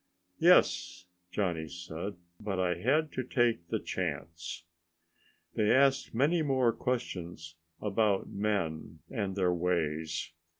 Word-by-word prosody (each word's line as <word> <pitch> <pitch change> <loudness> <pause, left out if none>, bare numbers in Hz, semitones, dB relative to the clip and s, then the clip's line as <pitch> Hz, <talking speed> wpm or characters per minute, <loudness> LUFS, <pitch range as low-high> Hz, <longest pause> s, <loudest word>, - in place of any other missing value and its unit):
"Yes," 90 - +4 0.3
Johnny 90 -5 -1
said, 90 +3 -6 0.2
"but 100 -3 -3
I 90 -1 +2
had 150 - +2
to 130 - -2
take 120 -8 +1
the - - 0
chance." 85 0 -4 0.9
They 105 -1 +2
asked 135 -1 +3
many 155 +7 +3
more 130 -5 +2
questions 90 -10 -3 0.3
about 105 -1 +1
men 85 -6 -2
and 100 -6 -2
their 90 -3 +2
ways. 80 -4 -1
95 Hz, 115 wpm, -31 LUFS, 85-120 Hz, 0.9 s, Yes